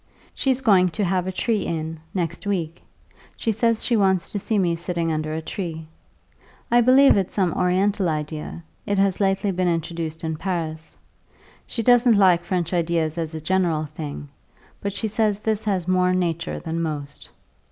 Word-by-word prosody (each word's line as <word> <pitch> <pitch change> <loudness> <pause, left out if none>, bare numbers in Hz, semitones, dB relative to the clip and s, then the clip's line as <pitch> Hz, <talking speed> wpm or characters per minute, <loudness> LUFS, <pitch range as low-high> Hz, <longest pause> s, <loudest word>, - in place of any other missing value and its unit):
She's 265 -1 0
going 190 -7 +4
to 210 - +1
have 185 -1 0
a - - -1
tree 215 +2 0
in, 160 -1 -4
next 175 +1 -3
week; 170 -4 -2 0.6
she 225 - 0
says 225 +1 +1
she 240 - +2
wants 190 -4 +2
to 205 - -2
see 215 +2 -1
me 175 -4 +2
sitting 170 -1 -2
under 155 0 -2
a 160 +1 -3
tree. 160 -2 -5 0.9
I 240 0 +6
believe 260 +3 +6
it's 190 -2 -1
some 185 -5 +1
oriental 185 +1 +1
idea; 155 +2 -4 0.2
it 205 - 0
has 195 -1 +2
lately 195 0 +1
been 185 0 0
introduced 165 -1 -3
in 160 -1 -2
Paris. 160 -3 -4 0.7
She 230 - -3
doesn't 245 -1 +5
like 180 -3 +5
French 175 -1 -2
ideas 165 -2 0
as 160 -1 -3
a - - -3
general 165 -2 +1
thing; 150 -1 -7 0.5
but 200 - -2
she 220 - -3
says 215 -1 +1
this 215 0 -2
has 190 -4 -1
more 185 0 +2
nature 170 -2 -1
than 165 0 -3
most. 145 -3 -5
180 Hz, 175 wpm, -23 LUFS, 165-200 Hz, 0.9 s, I